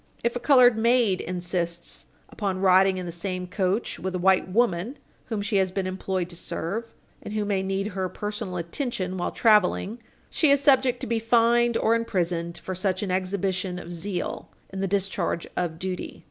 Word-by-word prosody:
If 235 Hz, +1 st, 0 dB
a -, -, -1 dB
colored 245 Hz, -3 st, +5 dB
maid 230 Hz, -5 st, +3 dB
insists 175 Hz, -1 st, -4 dB, 0.2 s
upon 195 Hz, -3 st, -3 dB
riding 190 Hz, 0 st, +5 dB
in 180 Hz, -, -4 dB
the 175 Hz, -, -5 dB
same 180 Hz, +2 st, -4 dB
coach 190 Hz, +4 st, -1 dB
with 190 Hz, 0 st, -3 dB
a -, -, +1 dB
white 185 Hz, +1 st, +3 dB
woman 215 Hz, -, 0 dB, 0.3 s
whom 220 Hz, -4 st, -3 dB
she 205 Hz, 0 st, +1 dB
has 190 Hz, -1 st, +2 dB
been 190 Hz, 0 st, -2 dB
employed 185 Hz, -1 st, -2 dB
to -, -, -11 dB
serve, 195 Hz, +6 st, -3 dB, 0.4 s
and 210 Hz, -, -7 dB
who 210 Hz, -1 st, 0 dB
may 200 Hz, -2 st, 0 dB
need 195 Hz, +1 st, -2 dB
her 190 Hz, -2 st, -3 dB
personal 205 Hz, -3 st, -4 dB
attention 185 Hz, -, -3 dB
while 175 Hz, -, -1 dB
traveling, 215 Hz, 0 st, +2 dB, 0.3 s
she 310 Hz, -, +3 dB
is 280 Hz, 0 st, +5 dB
subject 260 Hz, -3 st, +3 dB
to -, -, -2 dB
be 230 Hz, 0 st, 0 dB
fined 235 Hz, +1 st, +3 dB
or 225 Hz, -, +2 dB
imprisoned 175 Hz, -7 st, -1 dB
for 190 Hz, -, -5 dB
such 185 Hz, +1 st, -1 dB
an 195 Hz, -, -2 dB
exhibition 185 Hz, 0 st, -1 dB
of 175 Hz, 0 st, -7 dB
zeal 175 Hz, +2 st, -4 dB, 0.2 s
in 190 Hz, -, -4 dB
the 195 Hz, -, 0 dB
discharge 190 Hz, -3 st, -1 dB
of 170 Hz, -3 st, -2 dB
duty. 185 Hz, +1 st, -5 dB
190 Hz, 185 wpm, -25 LUFS, 180-225 Hz, 0.4 s, colored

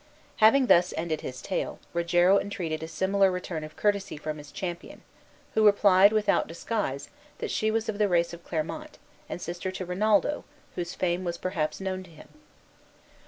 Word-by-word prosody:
Having 240 Hz, +5 st, +6 dB
thus 180 Hz, -6 st, +4 dB
ended 160 Hz, -1 st, -2 dB
his 130 Hz, -1 st, -7 dB
tale, 190 Hz, -, -2 dB, 0.2 s
Rogero 175 Hz, +3 st, +4 dB
entreated 170 Hz, -6 st, -4 dB
a 160 Hz, -, -5 dB
similar 195 Hz, +3 st, +2 dB
return 180 Hz, -3 st, -4 dB
of 155 Hz, 0 st, -9 dB
courtesy 200 Hz, -5 st, 0 dB
from 155 Hz, 0 st, -5 dB
his 145 Hz, 0 st, -12 dB
companion, 180 Hz, -3 st, -6 dB, 0.5 s
who 220 Hz, -, +3 dB
replied, 200 Hz, -1 st, +6 dB
without 215 Hz, -1 st, +2 dB
disguise, 165 Hz, -5 st, -3 dB, 0.3 s
that -, -, -4 dB
she 215 Hz, -, +1 dB
was 225 Hz, 0 st, 0 dB
of 215 Hz, -1 st, -3 dB
the 210 Hz, -, +4 dB
race 170 Hz, -1 st, +2 dB
of 170 Hz, 0 st, -10 dB
Clermont, 180 Hz, -, -4 dB, 0.3 s
and -, -, -4 dB
sister 175 Hz, +2 st, -4 dB
to 185 Hz, 0 st, -5 dB
Rinaldo, 210 Hz, +10 st, +1 dB, 0.3 s
whose 175 Hz, -1 st, -4 dB
fame 180 Hz, 0 st, 0 dB
was 170 Hz, -1 st, -3 dB
perhaps 155 Hz, -5 st, -2 dB
known 190 Hz, -1 st, -3 dB
to 185 Hz, -, -13 dB
him. 160 Hz, -, -15 dB
180 Hz, 170 wpm, -27 LUFS, 170-205 Hz, 0.5 s, Having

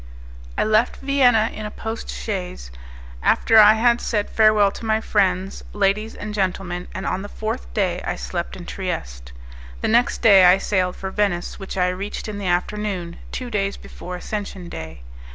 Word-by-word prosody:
I -, -, +3 dB
left 215 Hz, +3 st, +2 dB
Vienna 250 Hz, -5 st, +3 dB
in 215 Hz, 0 st, -5 dB
a -, -, -6 dB
post 225 Hz, +1 st, -6 dB
chaise, 180 Hz, -, -5 dB, 0.5 s
after 225 Hz, -1 st, +4 dB
I 210 Hz, 0 st, +9 dB
had 235 Hz, +1 st, +3 dB
said 210 Hz, -3 st, -1 dB
farewell 215 Hz, -2 st, +4 dB
to -, -, -10 dB
my 220 Hz, -1 st, +1 dB
friends, 195 Hz, -3 st, 0 dB
ladies 205 Hz, +2 st, 0 dB
and 210 Hz, 0 st, -6 dB
gentlemen, 185 Hz, -3 st, -2 dB
and 190 Hz, -, -6 dB
on 185 Hz, -, -1 dB
the 205 Hz, -, -7 dB
fourth 210 Hz, -, -5 dB
day -, -, 0 dB
I -, -, -2 dB
slept -, -, -4 dB
in -, -, -9 dB
Trieste. -, -, -5 dB, 0.5 s
The -, -, 0 dB
next 235 Hz, +2 st, +2 dB
day 195 Hz, -4 st, +8 dB
I 180 Hz, +1 st, +7 dB
sailed 185 Hz, -2 st, 0 dB
for 190 Hz, 0 st, -5 dB
Venice, 195 Hz, -4 st, -1 dB
which 195 Hz, 0 st, -7 dB
I 180 Hz, -1 st, +2 dB
reached 195 Hz, +5 st, -5 dB
in 210 Hz, -1 st, -5 dB
the 195 Hz, -, -3 dB
afternoon, 180 Hz, -1 st, -2 dB
two 250 Hz, -2 st, -5 dB
days 200 Hz, -2 st, -1 dB
before 180 Hz, 0 st, -8 dB
Ascension 195 Hz, -1 st, -5 dB
Day. 80 Hz, -, -8 dB
200 Hz, 175 wpm, -22 LUFS, 180-215 Hz, 0.5 s, I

